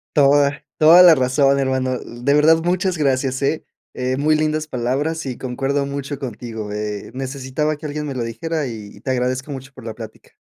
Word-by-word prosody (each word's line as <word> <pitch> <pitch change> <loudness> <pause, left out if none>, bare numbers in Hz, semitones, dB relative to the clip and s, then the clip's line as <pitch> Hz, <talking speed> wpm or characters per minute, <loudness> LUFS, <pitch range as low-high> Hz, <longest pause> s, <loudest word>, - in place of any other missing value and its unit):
Toda 140 0 +3
toda 165 +4 +8
la 175 -3 +8
razón, 135 +1 +2
hermano, 130 -1 0
de 120 +4 -2
verdad 155 +2 +5
muchas 180 0 0
gracias, 135 -2 0
eh 155 +3 0 0.3
eh 130 +1 -2
muy 155 +2 +2
lindas 155 0 0
palabras 140 +6 -2
y 130 -2 -4
concuerdo 135 +2 -2
mucho 140 0 -5
contigo, 115 -4 -6
eh, 105 0 -5
necesitaba 135 +3 -3
que 155 - -11
alguien 150 0 -4
me 140 - -4
lo 120 - -2
dijera 145 +6 -3
y 110 -3 -7
y 100 - -15
te 130 +3 -3
agradezco 130 +3 -1
mucho 135 0 -8
por 130 -3 -13
la 110 - -5
plática. 110 -1 -11
135 Hz, 190 wpm, -20 LUFS, 125-150 Hz, 0.3 s, toda